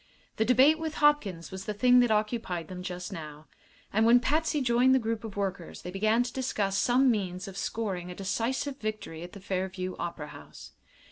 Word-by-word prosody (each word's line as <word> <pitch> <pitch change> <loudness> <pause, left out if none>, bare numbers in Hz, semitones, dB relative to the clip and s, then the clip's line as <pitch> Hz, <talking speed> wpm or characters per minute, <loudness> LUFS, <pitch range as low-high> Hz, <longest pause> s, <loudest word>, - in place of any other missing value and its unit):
The 220 - +2
debate 265 +6 +5
with 320 -1 -4
Hopkins 230 - +2
was 190 0 -7
the 210 - -3
thing 250 +3 +5
that 245 -1 +4
occupied 215 -5 -1
them 180 -1 -6
just 180 +2 -5
now, 155 -2 -8 0.5
and 220 +2 +3
when 235 +2 +7
Patsy 310 +3 +1
joined 255 0 +4
the 250 -4 0
group 225 0 -2
of 215 -3 -7
workers 195 -4 -4
they 180 - -6
began 215 +5 +2
to 245 - -6
discuss 210 -7 -1
some 250 +5 +4
means 185 -3 -3
of 195 - -8
scoring 195 -4 -3
a 180 - -7
decisive 235 +8 -2
victory 215 -7 -5
at 175 +1 -9
the 200 - -9
Fairview 185 -1 -3
Opera 165 -3 -5
House. - - -12
215 Hz, 195 wpm, -29 LUFS, 185-245 Hz, 0.5 s, when